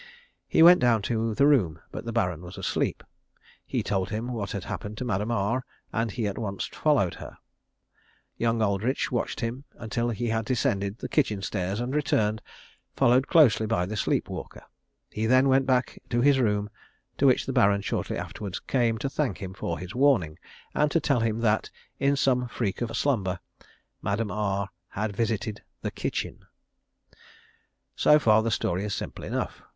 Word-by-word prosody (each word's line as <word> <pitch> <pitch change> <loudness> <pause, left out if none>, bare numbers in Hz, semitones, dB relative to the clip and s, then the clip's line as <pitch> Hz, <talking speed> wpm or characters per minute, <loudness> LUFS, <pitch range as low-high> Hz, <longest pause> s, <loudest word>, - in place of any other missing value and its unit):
He 160 - +5
went 175 +1 +9
down 115 -4 +3
to 115 0 -1
the 140 - +4
room, 115 - +3
but - - -6
the 115 - -3
Baron 90 -8 0
was 90 +1 -10
asleep. - - -1 0.6
He - - -1
told 95 -2 -1
him 115 +4 -3
what 105 -4 -3
had 100 - -4
happened 105 +1 -6
to 125 - -3
Madame 105 -1 -1
R, 115 +3 0 0.3
and 115 0 0
he 115 +2 -3
at 100 -1 -3
once 100 -4 -3
followed 135 - +1
her. - - -9 1.0
Young 115 -1 +1
Aldridge 105 +6 0
watched 120 0 -2
him 120 +3 -3
until 120 +1 -2
he 120 +1 -2
had 110 0 0
descended 100 -4 0
the - - -5
kitchen 110 -10 0
stairs 95 +1 -2
and 125 +2 -2
returned, 110 -7 +1 0.5
followed 125 +3 +4
closely 125 -9 +5
by 90 -5 +1
the 105 +4 -5
sleep 105 - 0
walker. - - -8 0.5
He 110 +1 -1
then 130 +3 +5
went 135 0 +3
back 130 -1 +1
to 120 0 +1
his 140 0 +5
room, 105 -3 +1 0.5
to 140 - +5
which 130 - +3
the 135 - -3
Baron 100 -5 +4
shortly - - -2
afterwards 100 -3 -5
came 120 -4 +1
to 135 - -2
thank 135 -6 -1
him 95 -1 -7
for - - -3
his 90 +3 -7
warning, 120 - +2 0.3
and 150 0 +2
to 165 - +2
tell 140 -5 +1
him 115 0 0
that, 110 -2 +1 0.3
in 140 +1 +3
some 125 -2 +2
freak 110 -4 -3
of 115 -1 -2
slumber, 95 -10 0 0.6
Madame 105 +1 -1
R 100 -1 -1 0.2
had 105 0 -3
visited 110 -1 -1 0.2
the - - -2
kitchen. - - -3 1.6
So 150 - +6
far 110 -6 +4
the 115 - -1
story 95 -3 0
is 105 -2 -2
simple - - -6
enough. - - -3
115 Hz, 175 wpm, -27 LUFS, 100-125 Hz, 1.6 s, went